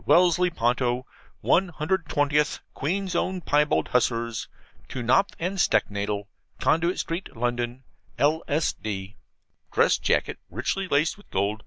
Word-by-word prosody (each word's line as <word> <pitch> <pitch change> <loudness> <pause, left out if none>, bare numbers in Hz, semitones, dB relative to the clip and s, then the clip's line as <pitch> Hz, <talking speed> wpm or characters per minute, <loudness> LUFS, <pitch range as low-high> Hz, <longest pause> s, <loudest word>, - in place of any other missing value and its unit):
WELLESLEY 180 0 +5
PONTO, 125 -3 0 0.4
120TH 150 -4 +1
QUEEN'S 185 +5 -2
OWN 185 +1 0
PYEBALD 150 -1 +2
HUSSARS, 115 -2 0 0.4
TO 125 - -4
KNOPF 130 +12 +4
AND 185 +2 -1
STECKNADEL, 100 0 0 0.3
CONDUIT 170 +3 +2
STREET, 170 -6 -4
LONDON. 120 +1 -2 0.3
L. 155 +3 +3
s. 150 +2 +1
d 100 -1 -5 0.6
Dress - - +3
Jacket, - - 0
richly 130 - -2
laced 155 +3 +2
with 205 - -19
gold 100 +3 0
145 Hz, 120 wpm, -26 LUFS, 120-175 Hz, 0.6 s, WELLESLEY